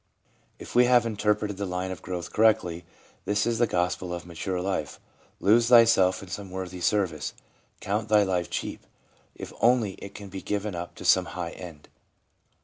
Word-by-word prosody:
If - - -10
we 125 +1 +6
have 120 -1 +4
interpreted 105 -2 0
the 100 -1 -3
line 90 +1 -3
of 95 - -7
growth 90 -1 -6
correctly, 90 -6 +2 0.4
this 105 +1 +1
is 115 -1 0
the 120 - +3
gospel 90 -1 -1
of 85 - -8
mature 90 +2 -4
life: 90 -5 -3 0.4
Lose 115 +4 +4
thyself 115 -6 +5
in 95 - -11
some 100 +1 -6
worthy 90 -1 -6
service. 85 -7 0 0.5
Count 105 +2 -2
thy 105 -1 +5
life 90 -3 -1
cheap, - - -5 0.5
if - - -8
only 120 -4 +3
it 100 - -9
can 100 -1 -9
be 95 0 -7
given 105 0 -3
up 85 0 -6
to - - -10
some 95 -1 +5
high 85 -1 -3
end. 80 -5 -11
95 Hz, 175 wpm, -26 LUFS, 90-105 Hz, 0.5 s, we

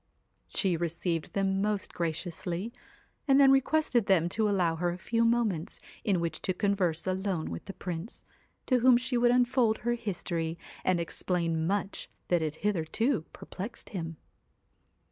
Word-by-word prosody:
She 190 -4 +2
received 170 0 -2
them 195 -1 +1
most 210 -1 -1
graciously, 175 +5 -3 0.5
and 275 0 +6
then 275 -1 +7
220 - - +7
requested 270 -4 +2
them 175 -3 +3
to 215 +3 +1
allow 175 -5 +1
her 175 +1 0
a 175 - -3
few 230 +4 0
moments 230 -8 +1 0.2
in 200 - +2
THE - - +1
which 170 -1 -3
to 185 - 0
converse 185 -5 +1
alone 185 - -1
with 85 - -6
the 195 - -7
Prince, 180 +3 -6 0.4
to 255 -2 +3
whom 255 +1 +6
WHITE 240 - +2
she 255 0 0
would 240 0 +4
unfold 245 -2 +3
her 240 0 -1
history, 170 -7 -3 0.3
and 185 -2 +2
explain 165 -1 -1
much 200 +1 -2
CAT - - -40
that 175 -2 +3
had 155 -1 -2
hitherto 210 - +1
perplexed 210 +6 -7
him. 165 -4 -5
190 Hz, 165 wpm, -29 LUFS, 170-230 Hz, 0.5 s, then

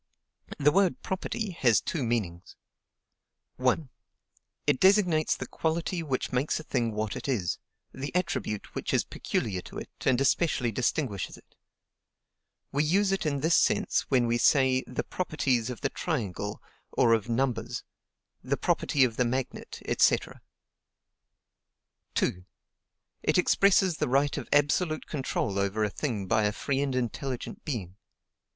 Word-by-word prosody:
The 150 +1 +4
word 195 0 +2
PROPERTY 195 +2 -3
has 120 -4 +5
two 150 - -3
meanings: 100 -8 -2 1.0
1. 130 +3 +1 0.8
It 145 -3 +2
designates 185 -5 +4
the - - -4
quality 170 +2 -2
which 135 -5 -2
makes 130 +5 0
a - - -7
thing 120 -6 -1
what 105 0 -2
it - - -6
is; 105 -11 -1 0.3
the 135 +2 -5
attribute 170 - -2
which - - -2
is - - +3
peculiar 95 -5 -2
to - - -10
it, - - -7
and 130 -2 +3
especially 135 -3 +2
distinguishes 120 - -1
it. - - -21 1.2
We 145 +2 +1
use 190 +6 +2
it 195 -4 0
in 140 -2 -1
this 160 +3 +3
sense - - +2
when 125 -3 +3
we 120 0 +1
say 130 -1 +4
THE 125 - -3
PROPERTIES 135 -9 -1
OF 125 - -6
THE - - +1
TRIANGLE 105 - -3 0.3
or 115 - +4
of 110 0 0
NUMBERS; 120 -1 -1 0.6
THE - - 0
PROPERTY 140 - +2
OF 115 -3 +1
THE 125 - +3
MAGNET, 130 +2 -4 0.2
&c. - - +6 2.0
2. 90 - 0 0.8
It - - +2
expresses 185 -1 +4
the - - 0
right 140 +2 +2
of - - -5
absolute 155 +3 +2
control 130 -8 -2
over 100 +2 0
a 105 - 0
thing 110 -9 -3
by 110 +1 +2
a 105 - +2
free 135 +5 -1
and 135 -2 -1
intelligent 125 +1 -3
being. 100 - -4
130 Hz, 145 wpm, -28 LUFS, 115-155 Hz, 2.0 s, c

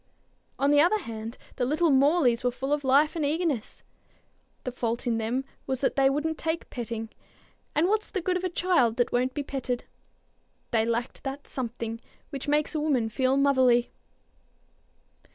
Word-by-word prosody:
On 280 +1 +2
the 290 0 +6
other 355 +7 +4
hand, 225 - -7 0.2
the 250 - 0
little 305 +5 +2
Morleys 270 -3 +4
were 250 - +3
full 265 +3 -2
of 295 -1 -1
life 280 +4 +4
and 320 - -1
eagerness. 295 -5 -1 0.8
The 255 - -3
fault 235 0 -2
in 230 -2 +1
them 240 +5 -1 0.2
was 265 0 -2
that 270 - +1
they 270 -1 +4
wouldn't 300 +3 -1
take 325 +1 -2
petting; 230 -2 -4 0.7
and 315 +4 +3
what's 430 +2 0
the 390 - -1
good 365 +1 +1
of 365 - -2
a 370 - 0
child 335 -11 +2
that 245 -1 +1
won't 250 +1 0
be 290 - -2
petted? 260 -3 -3 0.9
They 225 -1 +2
lacked 235 +1 -2
that 275 +1 -5
something 230 -2 -4 0.3
which 275 -1 -5
makes 295 +2 +2
a 310 - 0
woman 270 -7 +1
feel 260 +4 +1
motherly. 260 -4 +4
270 Hz, 170 wpm, -27 LUFS, 240-300 Hz, 0.9 s, the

